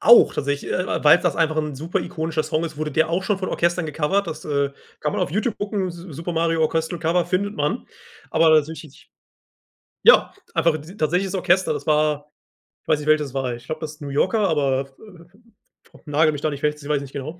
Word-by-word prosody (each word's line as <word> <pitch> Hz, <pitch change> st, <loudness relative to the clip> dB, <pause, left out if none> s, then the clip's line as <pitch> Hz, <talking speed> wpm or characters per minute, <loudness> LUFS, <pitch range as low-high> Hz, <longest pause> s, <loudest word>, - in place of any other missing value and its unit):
Auch, 235 Hz, -, +7 dB
tatsächlich, 140 Hz, 0 st, -2 dB
äh, 185 Hz, -3 st, -2 dB
weil's 150 Hz, +4 st, +7 dB
das 175 Hz, -5 st, 0 dB
einfach 160 Hz, -2 st, +1 dB
'n 150 Hz, -2 st, -2 dB
super 160 Hz, +6 st, -2 dB
ikonischer 160 Hz, -1 st, -2 dB
Song 155 Hz, +2 st, -1 dB
ist, 155 Hz, -2 st, -6 dB
wurde 155 Hz, 0 st, -2 dB
der 160 Hz, +3 st, +1 dB
auch 175 Hz, +3 st, 0 dB
schon 205 Hz, +1 st, 0 dB
von 190 Hz, -, -3 dB
Orchestern 175 Hz, 0 st, 0 dB
gecovert, 160 Hz, +6 st, 0 dB
das, 160 Hz, -2 st, -6 dB
äh, 140 Hz, -2 st, 0 dB, 0.3 s
kann 150 Hz, -, -1 dB
man -, -, -2 dB
auf -, -, -1 dB
Youtube 215 Hz, -, -1 dB
gucken, 205 Hz, -2 st, -2 dB
„S-Super 170 Hz, -1 st, -7 dB
Mario 165 Hz, 0 st, +1 dB
Orchestral 160 Hz, +2 st, 0 dB
Cover“ 170 Hz, +2 st, +1 dB
findet 200 Hz, +2 st, -1 dB
man. 150 Hz, +11 st, -2 dB, 0.4 s
Aber 165 Hz, 0 st, +4 dB
tatsächlich 155 Hz, -1 st, -2 dB, 0.9 s
ja, -, -, +6 dB, 0.2 s
einfach 165 Hz, -2 st, +2 dB
t 160 Hz, +6 st, -12 dB
tatsächliches 180 Hz, +4 st, 0 dB
Orchester, 185 Hz, 0 st, +2 dB
das -, -, -5 dB
war 150 Hz, -1 st, +1 dB, 0.6 s
weiß 155 Hz, -, +2 dB
nicht, 150 Hz, -, -7 dB
welches 155 Hz, -1 st, +3 dB
es 130 Hz, -, -12 dB
war, 130 Hz, -2 st, -1 dB
ich 120 Hz, +1 st, -10 dB
glaube, 155 Hz, +3 st, -5 dB
das 155 Hz, 0 st, -7 dB
New 145 Hz, -, -6 dB
Yorker, 185 Hz, +10 st, +1 dB
aber 135 Hz, -3 st, +1 dB, 1.0 s
vo -, -, -20 dB
nagele 155 Hz, +1 st, +3 dB
mich 145 Hz, -2 st, -6 dB
da 155 Hz, -, +1 dB
nicht 140 Hz, -1 st, -6 dB
fest, 150 Hz, 0 st, -1 dB
ich 145 Hz, -, -9 dB
weiss 145 Hz, -2 st, +1 dB
nicht 140 Hz, -1 st, -10 dB
genau. 155 Hz, +5 st, -6 dB
155 Hz, 210 wpm, -22 LUFS, 150-175 Hz, 1.0 s, Auch